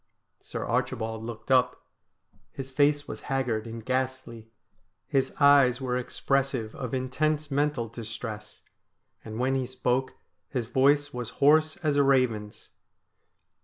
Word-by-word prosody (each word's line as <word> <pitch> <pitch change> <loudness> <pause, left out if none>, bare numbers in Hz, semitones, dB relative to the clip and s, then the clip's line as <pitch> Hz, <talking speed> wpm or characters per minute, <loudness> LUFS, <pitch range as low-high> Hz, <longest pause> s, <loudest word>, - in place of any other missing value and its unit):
Sir - - -5
Archibald 110 0 -2
looked 115 +2 -7
up. 125 -1 +2 0.6
His 135 0 -8
face 145 +1 +2
was - - -7
haggard 120 -5 -1
and 115 -1 -8
ghastly. 130 -3 -3 0.6
His 135 -1 0
eyes 140 -3 +6
were 125 -2 -2
expressive 130 -2 -1
of 130 -1 -4
intense 150 +4 -1
mental 140 -4 0
distress, 110 -2 -7 0.6
and 110 0 -7
when 130 +2 +1
he 130 -2 -1
spoke 130 +1 -1 0.3
his 125 -4 -2
voice 145 +4 +2
was 125 -2 -4
hoarse 155 +4 +4
as 145 -2 +2
a 140 - +5
raven's. 125 -6 0
130 Hz, 130 wpm, -27 LUFS, 115-140 Hz, 0.6 s, eyes